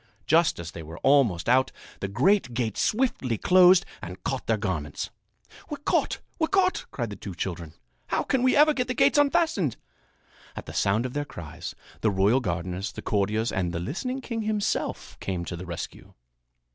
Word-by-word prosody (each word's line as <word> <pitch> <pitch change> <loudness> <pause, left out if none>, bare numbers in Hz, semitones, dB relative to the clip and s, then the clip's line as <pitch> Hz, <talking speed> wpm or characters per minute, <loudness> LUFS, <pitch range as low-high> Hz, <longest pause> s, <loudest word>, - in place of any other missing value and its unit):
Just 165 +1 +4
as 85 -1 -6
they 85 - -8
were 80 +1 -9
almost 130 - +4
out, 130 +2 +4 0.3
the 100 - -2
great 130 - +2
gates 115 -4 -1
swiftly 210 - +1
closed 185 - +6 0.2
and 90 +1 -8
caught 135 -1 -3
their 115 - +2
garments. 90 -8 -3 0.6
"We're 295 - -4
caught! 290 - 0 0.2
We're 320 - +2
caught!" 380 -1 +1
cried 120 -5 -4
the - - -5
two 95 -1 -8
children. 85 -3 -5 0.3
"How - - 0
can 265 - +1
we 255 0 +4
ever 300 +1 +6
get 250 -3 -1
the 255 - -2
gates 290 - +4
unfastened!" 290 - +2 0.8
At - - -7
the - - -8
sound 110 +5 +1
of 125 - -4
their 145 - -1
cries, 85 - -8 0.2
the 110 - +2
royal 100 +6 +3
gardeners, 90 -1 -3
the - - -9
courtiers 105 +2 0
and 90 -2 -1
the 85 - -2
listening 250 - -3
king 230 -3 -3
himself 215 -1 -2
came 90 -3 -3
to 90 - -5
the 90 +1 -8
rescue. 85 -1 -7
120 Hz, 185 wpm, -26 LUFS, -, 0.8 s, closed